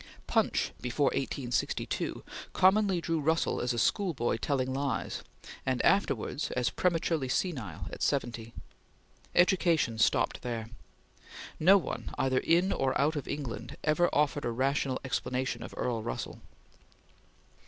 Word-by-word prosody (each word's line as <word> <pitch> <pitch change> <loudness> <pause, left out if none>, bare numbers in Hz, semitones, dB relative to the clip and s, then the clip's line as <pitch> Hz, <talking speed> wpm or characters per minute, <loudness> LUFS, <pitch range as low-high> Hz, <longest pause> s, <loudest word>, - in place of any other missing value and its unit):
Punch, - - +1
before 130 +3 +1
1862, 125 -3 -2 0.3
commonly 190 0 +4
drew 165 -1 0
Russell 160 +3 +1
as 125 - 0
a 120 - -2
schoolboy 130 - +1
telling 130 +1 -1
lies, 140 0 -2 0.4
and 130 -1 0
afterwards 160 - +1
as 125 -2 0
prematurely 165 -6 0
senile, 130 - -2
at - - -8
seventy. 115 -1 -1 0.8
Education 170 - +3
stopped - - +2
there. 115 -2 -4 0.9
No 190 +5 +7
one, 185 - -4
either 130 -2 +2
in 175 +6 +3
or 135 -1 0
out 150 +3 +2
of 145 - -4
England, 140 -5 -5
ever 160 +3 +3
offered 145 -1 +1
a - - 0
rational 130 +2 0
explanation 130 0 -2
of - - -7
Earl 115 -3 -1
Russell. 115 - -5
135 Hz, 125 wpm, -30 LUFS, 125-165 Hz, 0.9 s, No